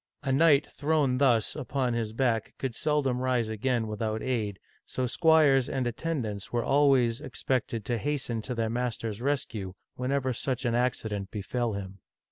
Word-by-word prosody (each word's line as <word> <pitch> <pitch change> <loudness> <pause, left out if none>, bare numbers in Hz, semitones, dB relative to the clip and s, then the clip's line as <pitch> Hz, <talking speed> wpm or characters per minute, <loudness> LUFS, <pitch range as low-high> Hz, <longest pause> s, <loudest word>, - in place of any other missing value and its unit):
A 135 - 0
knight 145 +1 +5
thrown 145 -4 0
thus 120 -6 +3
upon 130 -3 -1
his 115 -2 -2
back 115 -2 0
could 130 -3 -3
seldom 140 -3 0
rise 125 -3 +1
again 115 +2 0
without 110 +1 -2
aid, 110 -6 -1 0.3
so 130 - -2
squires 145 -2 +4
and 130 -2 -1
attendants 120 -5 -3
were 120 -1 0
always 135 -5 +3
expected 120 -3 -2
to 120 0 -1
hasten 130 -4 -2
to 125 +3 -5
their 115 -1 0
master's 115 -3 -3
rescue 115 -9 -2 0.2
whenever 130 0 0
such 125 +1 -2
an 120 - +1
accident 110 -5 -1
befell 115 +3 -2
him. 95 -1 -6
125 Hz, 155 wpm, -28 LUFS, 110-135 Hz, 0.3 s, knight